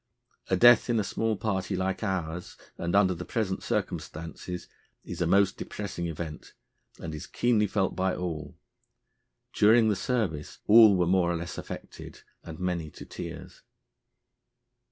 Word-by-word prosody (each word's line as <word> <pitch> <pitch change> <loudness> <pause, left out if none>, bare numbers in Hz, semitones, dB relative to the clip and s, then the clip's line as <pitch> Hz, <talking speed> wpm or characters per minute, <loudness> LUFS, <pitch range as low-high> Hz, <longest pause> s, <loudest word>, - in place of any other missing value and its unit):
A - - +3
death 120 0 +6
in 115 -2 +2
a - - +1
small 110 +2 -1
party 95 -2 -2
like 95 0 -2
ours, 90 -4 -3 0.2
and 85 +2 -2
under 95 -2 +4
the 90 0 -6
present 95 -2 -2
circumstances, 85 +2 -4 0.4
is - - -7
a 85 - +2
most 100 +2 +3
depressing 85 0 -5
event, 80 -1 -7 0.5
and 80 - -6
is 75 - -7
keenly 115 -4 +2
felt 95 -1 0
by 95 0 0
all. 85 -4 -5 1.0
During 110 +1 +5
the 105 - +2
service 95 -10 -2
all 110 -2 +8
were 90 - +2
more 90 -1 +2
or - - -1
less 85 +2 -5
affected, - - -9 0.2
and 80 -2 -8
many 90 -4 -2
to - - -11
tears." - - -8
95 Hz, 150 wpm, -28 LUFS, 85-105 Hz, 1.0 s, all